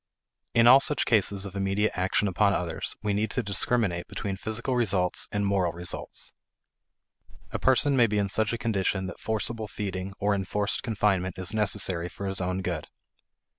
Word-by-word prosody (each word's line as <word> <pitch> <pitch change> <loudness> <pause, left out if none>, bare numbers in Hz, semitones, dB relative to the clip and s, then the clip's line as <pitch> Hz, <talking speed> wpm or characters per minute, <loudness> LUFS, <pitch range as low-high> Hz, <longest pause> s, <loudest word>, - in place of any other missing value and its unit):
In 115 0 +6
all 130 +3 +9
such 145 0 +1
cases 100 -3 +2
of 100 0 -8
immediate 100 +2 +1
action 95 +3 +1
upon 100 +2 +2
others, 85 -2 -3
we 105 -1 0
need 105 +2 0
to 125 - -1
discriminate 100 -3 0
between 100 -3 -4
physical 110 +6 -2
results 95 -7 0
and 105 0 0
moral 95 -4 +1
results. 85 +1 -5 1.2
A - - -3
person 135 +2 +4
may 120 -3 +5
be 105 -1 -1
in 100 -1 +1
such 110 +2 +1
a 120 - -1
condition 100 -4 0
that 95 - -7
forcible 110 0 -1
feeding 100 -2 -5
or 105 0 +1
enforced 100 +1 -1
confinement 100 -6 0
is 95 +1 -1
necessary 95 -5 +1
for 100 - -7
his 95 -1 0
own 90 +1 -2
good. 85 -4 -3
100 Hz, 170 wpm, -27 LUFS, 95-110 Hz, 1.2 s, all